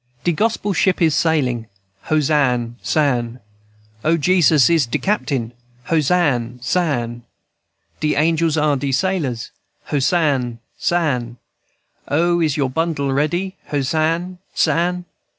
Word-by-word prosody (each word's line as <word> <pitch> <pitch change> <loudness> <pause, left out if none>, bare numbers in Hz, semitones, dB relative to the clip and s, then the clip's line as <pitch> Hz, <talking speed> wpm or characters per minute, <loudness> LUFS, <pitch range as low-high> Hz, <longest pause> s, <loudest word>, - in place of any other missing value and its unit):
_ - - -35
"De 175 - +2
Gospel 210 +3 0
ship 185 +1 +2
is 160 -3 +3
sailin', 130 -8 +1 0.4
Hosann 135 -6 +1
sann. 125 -5 0 0.6
O, 165 +2 +3
Jesus 160 -4 +4
is 165 -7 +3
de 115 - -1
captain, 135 - -1 0.4
Hosann 145 -7 +1
sann. 120 -3 -1 0.8
De 150 -1 0
angels 160 +1 +2
are 150 -2 +2
de 140 +1 -2
sailors, 135 -7 -1 0.4
Hosann 140 -5 +1 0.2
sann. 125 -9 -1 0.7
O, 170 +3 +2
is 155 -3 +1
your 135 -3 0
bundle 145 -3 -1
ready? 175 +7 -1
Hosann 160 +6 -1 0.2
sann. 180 +1 +1
150 Hz, 115 wpm, -19 LUFS, 130-170 Hz, 0.8 s, Jesus